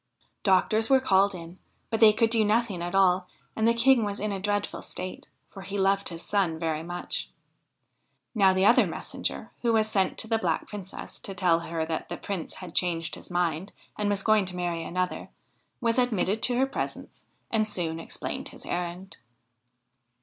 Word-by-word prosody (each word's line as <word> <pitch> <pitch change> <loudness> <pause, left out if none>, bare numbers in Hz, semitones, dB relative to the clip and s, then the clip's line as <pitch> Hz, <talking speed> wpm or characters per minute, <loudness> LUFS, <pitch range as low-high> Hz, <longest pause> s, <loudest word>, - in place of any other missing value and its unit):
Doctors 215 +3 +3
were 265 -1 +6
called 200 -5 +3
in, 170 +1 -10 0.3
but 225 - 0
they 220 -2 +8
could 225 +1 +2
do 225 -2 +5
nothing 210 -3 +1
at 175 +2 -3
all, 185 -1 +4 0.3
and 220 0 +2
the 230 - +5
King 240 0 +5
was 205 -1 -2
in 210 0 -1
a 195 - -3
dreadful 205 +1 -1
state, 185 0 -6 0.2
for 195 - -10
he 195 +1 -4
loved 195 +1 +2
his 170 -1 -6
son 190 -6 0
very 160 -1 -2
much. 175 +2 -4 1.0
Now 195 -4 +5
the 185 +1 +2
other 235 - +6
messenger, - - -4
who 235 -1 +2
was 220 -1 +3
sent 195 -3 +1
to - - -1
the 225 0 +1
Black 170 -6 -1
Princess 200 -2 -8
to 195 - -7
tell 175 -2 +3
her 165 -1 -3
that 160 0 -4
the 175 - -4
Prince 195 -5 -5
had 180 -3 -9
changed 165 -3 0
his - - -7
mind 175 +1 -1 0.2
and 210 -1 -1
was 200 -1 0
going 215 -2 +4
to 180 0 -3
marry 175 -2 -2
another, 180 +2 -3 0.5
was 230 0 +1
admitted 220 -3 +1
to 245 -1 +2
her 265 - +4
presence 270 - -6 0.3
and 215 -1 +1
soon 165 -5 -2
explained 165 - -5
his - - -10
errand. 180 +2 -4
195 Hz, 185 wpm, -27 LUFS, 175-215 Hz, 1.0 s, they